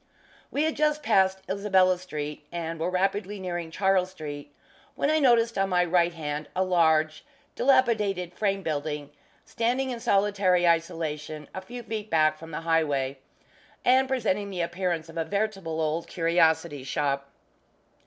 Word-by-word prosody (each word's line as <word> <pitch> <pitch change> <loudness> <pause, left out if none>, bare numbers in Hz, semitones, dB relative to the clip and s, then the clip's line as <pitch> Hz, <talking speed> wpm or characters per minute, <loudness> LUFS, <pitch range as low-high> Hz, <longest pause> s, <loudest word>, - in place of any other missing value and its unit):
We 290 - 0
had 315 0 0
just 300 0 +1
passed 190 -5 +2
Isabella 190 -2 +2
Street, 150 -4 -6
and 165 -1 -4
were 165 +2 0
rapidly 195 +2 -1
nearing 175 -3 -4
Charles 190 +1 +1
Street, 145 -5 -8 0.4
when 285 - +1
I 315 - +3
noticed 235 -5 +3
on 195 0 +1
my 180 -1 +3
right 175 0 +3
hand 150 -2 -4
a 185 - +2
large, 160 -4 +2 0.3
dilapidated 210 -9 +2
frame 195 0 -1
building, 150 -2 -3 0.3
standing 255 +3 -1
in 240 - -4
solitary 195 -5 +2
isolation 160 -3 -1
a 190 - -5
few 240 +5 -8
feet 220 -1 -5
back 155 -1 +3
from 165 - -10
the 165 - -5
highway, 145 -5 0 0.7
and 260 +1 +5
presenting 210 -6 0
the 185 -3 -3
appearance 170 -1 -2
of 165 - -11
a - - +1
veritable 195 -3 -2
Old 160 +1 -1
Curiosity 165 -4 +1
Shop. 140 0 -1
180 Hz, 150 wpm, -27 LUFS, 160-205 Hz, 0.7 s, and